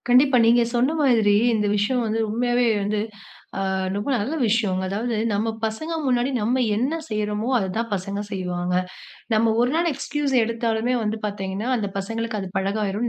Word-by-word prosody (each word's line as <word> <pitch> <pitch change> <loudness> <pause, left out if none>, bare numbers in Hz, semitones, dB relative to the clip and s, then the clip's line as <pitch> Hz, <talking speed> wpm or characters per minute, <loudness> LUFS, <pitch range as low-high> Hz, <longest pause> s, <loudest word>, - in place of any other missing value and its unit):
கண்டிப்பா. 255 +1 +5
நீங்க 235 +1 +5
சொன்ன 250 +5 +3
மாதிரி 225 -6 +4 0.2
இந்த 210 -1 0
விஷயம் 245 +5 +1
வந்து, 220 +1 -1
உண்மையாவே 240 +2 +1 0.2
வந்து, 210 +1 -1 0.6
அ - - -1 0.3
ரொம்ப 205 +7 -3
நல்ல 240 +9 -2
விஷயங்க. 205 -4 +1
அதாவது 225 +4 -2 0.2
நம்ம 205 +2 0 0.2
பசங்க 220 +10 -3
முன்னாடி 250 0 +2
நம்ம 240 +5 +1
என்ன 260 +9 0
செய்றோமோ, 210 +1 -2
அததான் 220 +3 -2
பசங்க 200 +1 -3
செய்வாங்க. 180 -2 -2 0.6
நம்ம 220 +1 +3
1 245 +1 +3
நாள் 340 +1 +2
எக்ஸ்கியூஸ் 280 0 -2
எடுத்தாலுமே 230 +1 0
வந்து 220 +1 -2
பார்த்தீங்கன்னா, 200 +2 -4
அந்த 210 -4 -2
பசங்களுக்கு 225 +2 -3
அது 190 - -5
பழகாயிரும். 205 +3 -1
220 Hz, 155 wpm, -23 LUFS, 205-245 Hz, 0.6 s, கண்டிப்பா